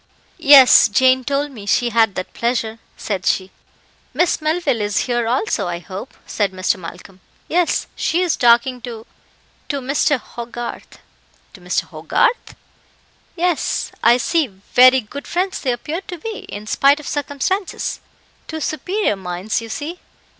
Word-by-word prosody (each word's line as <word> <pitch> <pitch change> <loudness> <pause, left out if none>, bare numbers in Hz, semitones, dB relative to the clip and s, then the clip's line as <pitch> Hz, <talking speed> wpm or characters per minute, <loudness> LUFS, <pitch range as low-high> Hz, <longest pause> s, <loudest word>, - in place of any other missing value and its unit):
"Yes, 280 -7 +8
Jane 260 +4 +3
told 285 +2 -1
me 210 -6 -11
she 240 +2 +2
had 225 -3 +3
that 185 - -5
pleasure," 230 -2 -2 0.2
said 195 -4 -3
she. 190 0 0 0.6
"Miss 350 -2 +1
Melville 310 -6 0
is 205 -1 0
here 240 -2 -1
also, 240 - 0
I 175 -1 -3
hope," 185 +2 -9
said 205 -3 -1
Mr. 185 0 0
Malcolm. 180 +2 -11 0.3
"Yes, 350 0 +1
she 350 +3 0
is 350 - +1
talking 240 +1 +3
to 230 -2 -8 0.6
to 285 - -1
Mr. 275 +1 +1
Hogarth." 240 0 -8 0.6
"To - - -14
Mr. - - -1
Hogarth? 485 - -1 0.8
Yes, 350 -2 -1
I 235 +1 +5
see 310 +4 +1
very 250 +6 +4
good 280 +6 -9
friends 370 +2 -2
they 260 - 0
appear 295 +9 -4
to 355 - -6
be, 435 +6 -7
in 205 +1 -7
spite 275 +6 +3
of 300 - -10
circumstances. 295 +7 -2 0.5
Two 315 - -5
superior 315 - -1
minds, 185 +4 -3
you 225 - -9
see." 310 +9 -5
250 Hz, 145 wpm, -19 LUFS, 220-305 Hz, 0.8 s, Yes